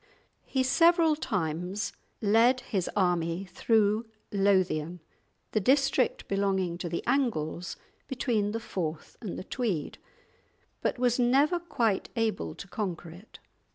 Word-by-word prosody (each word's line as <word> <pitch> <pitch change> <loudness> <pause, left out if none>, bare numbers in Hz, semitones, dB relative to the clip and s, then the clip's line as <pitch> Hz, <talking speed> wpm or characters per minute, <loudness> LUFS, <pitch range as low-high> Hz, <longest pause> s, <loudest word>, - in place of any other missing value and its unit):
He 260 -1 +1
several 330 +4 +4
times 180 - -2 0.3
led 230 +5 +4
his 195 -7 -2
army 175 -1 +1
through 215 +3 +1 0.2
Lothian, 185 -4 +1 0.5
the 215 - +2
district 270 +3 +2
belonging 190 -3 0
to 175 - -3
the 170 - -3
Angles 195 - -1 0.3
between 230 -5 0
the 225 - -2
Forth 165 -8 -5
and 210 -6 -5
the - - -5
Tweed, 200 - -3 0.8
but - - 0
was 245 0 +2
never 275 +8 +3
quite 230 - 0
able 215 - -1
to - - -9
conquer 180 -5 -4
it. 180 +7 -14
205 Hz, 120 wpm, -29 LUFS, 180-245 Hz, 0.8 s, several